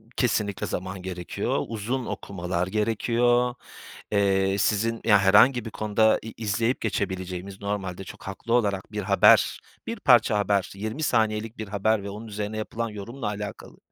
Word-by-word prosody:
Kesinlikle 105 -5 0
zaman 95 0 -4
gerekiyor, 90 -2 -3
uzun 115 +3 -3
okumalar 90 -1 -3
gerekiyor. 120 +4 +1 0.6
Eee, 95 -1 +2
sizin, 115 +3 +1
ya, 105 -3 +6
herhangi 105 +5 +5
bir - - -4
konuda 110 +1 +2
i 110 - -8
izleyip 115 +3 0
geçebileceğimiz 95 -2 -3
normalde 95 -2 -3
çok - - -11
haklı 100 +5 -4
olarak 100 -6 +1
bir 105 -1 -3
haber, - - +5 0.3
bir - - -4
parça 105 - +5
haber, 100 -1 +1
20 110 +9 -4
saniyelik 110 -2 0
bir 110 -2 -5
haber 105 +1 +1
ve 100 - -5
onun 110 +3 -8
üzerine 105 +1 -4
yapılan 115 +1 -3
yorumla 110 +4 -6
alakalı 105 0 -6
105 Hz, 145 wpm, -25 LUFS, 100-115 Hz, 0.6 s, ya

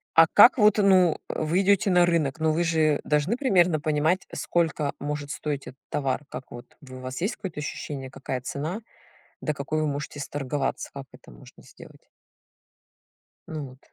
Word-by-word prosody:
А 165 - +9
как 235 +6 +8
вот, 210 -1 +5
ну, 185 -5 +5
вы 160 +4 0
идёте 200 0 +3
на 175 -1 +5
рынок, 160 -3 0
ну, 160 0 +2
вы 170 +2 +1
же 155 -3 +2
должны 150 - +1
примерно 180 - +3
понимать, 155 +4 0
сколько 160 -4 -1
может 145 0 -4
стоить 145 -3 -4
этот 130 +2 -11
товар? 140 0 -1
Как 125 +1 -8
вот, 120 +1 -11
вы 130 -2 -11
вас 130 +3 -6
есть 200 - -1
какое-то 190 -7 -7
ощущение, 140 -2 -5
какая 130 -1 -5
цена, 155 - -4 0.6
до 150 - -1
какой 155 +3 -2
вы 155 - 0
можете 145 0 -4
сторговаться? 140 -1 -3
Как 140 -1 -7
это - - -16
можно - - -16
сделать? - - -16 1.4
Ну, 150 -3 -5
вот. 130 +1 -16
150 Hz, 170 wpm, -26 LUFS, 140-175 Hz, 1.4 s, А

